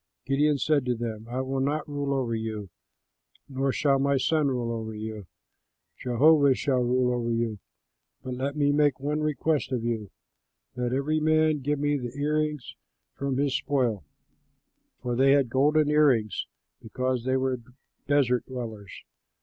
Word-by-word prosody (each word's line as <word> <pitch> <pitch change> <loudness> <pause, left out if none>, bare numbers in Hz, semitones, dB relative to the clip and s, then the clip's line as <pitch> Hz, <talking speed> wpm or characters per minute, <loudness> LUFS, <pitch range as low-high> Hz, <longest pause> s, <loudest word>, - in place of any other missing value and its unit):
Gideon 145 +2 +2
said 145 +1 +2
to 125 - +1
them, 110 -1 -5
"I 125 +2 -2
will 135 0 -2
not 145 +3 -1
rule 145 -1 -3
over 130 -4 0
you, 110 -4 -4 0.8
nor 135 0 -1
shall 140 0 +2
my 140 0 +2
son 155 +2 +2
rule 125 -3 -1
over 110 -1 -4
you; 110 -2 -6 0.7
Jehovah 140 +3 +4
shall 130 -1 0
rule 125 0 +2
over 120 -1 -2
you; 115 -2 -1 0.6
but 130 - -4
let 135 +3 -3
me 145 -1 +2
make 145 -2 +2
one 145 +2 -1
request 155 -1 0
of 125 -3 -1
you: 115 -4 -2 0.7
let 125 -1 -2
every 140 +4 0
man 155 0 +3
give 145 +2 -1
me 145 +1 +1
the 125 +1 -6
ear 150 +2 +1
rings 150 -5 -3 0.4
from 135 -2 -2
his 140 -1 +1
spoil" 125 - 0 1.0
(for 120 -1 -1
they 135 +2 +5
had 135 -4 +2
golden 150 +3 +3
ear 150 0 +5
rings, 110 -6 0 0.3
because 130 +2 -2
they 130 +1 +1
were 130 -1 -1 0.5
desert 135 -4 +2
dwellers). 110 -6 -7
130 Hz, 160 wpm, -27 LUFS, 120-145 Hz, 1.0 s, they